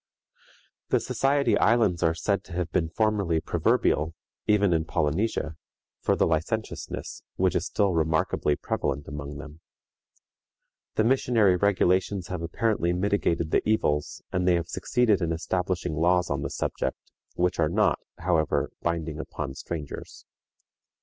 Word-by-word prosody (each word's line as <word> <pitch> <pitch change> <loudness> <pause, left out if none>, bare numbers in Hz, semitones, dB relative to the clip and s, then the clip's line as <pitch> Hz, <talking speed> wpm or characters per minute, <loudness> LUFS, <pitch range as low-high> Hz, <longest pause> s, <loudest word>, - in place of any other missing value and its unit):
" - - -32
The - - +3
Society 140 +1 +1
Islands 110 -7 +3
are 80 0 +2
said 100 +4 0
to 90 - -11
have 90 -1 -2
been 80 -2 +1
formerly 100 -4 +1
proverbial, 80 0 +1 0.3
even 105 -3 +4
in 80 -1 +2
Polynesia, 80 +1 -1 0.4
for - - +1
the - - +3
licentiousness 85 +8 -3
which - - +2
is - - 0
still 100 -3 +1
remarkably 80 -2 +1
prevalent 70 0 -2
among 75 0 -6
them. 75 +2 -10 1.4
The 110 - +3
missionary 115 -5 +3
regulations 95 -1 +1
have 90 -2 -3
apparently 85 +1 0
mitigated 90 -4 0
the - - +3
evils, 75 -9 0
and 90 0 0
they 90 - +5
have 85 -1 -2
succeeded 115 -6 +1
in 85 -1 0
establishing 90 +1 -1
laws 90 +2 +2
on 70 -1 -1
the 70 - -3
subject, - - -2 0.4
which 90 0 0
are 80 -2 +3
not, 105 +4 +2 0.2
however, 85 -3 +1
binding 80 -2 -2
upon 75 -3 -5
strangers. 75 +1 -7
85 Hz, 140 wpm, -26 LUFS, 80-100 Hz, 1.4 s, they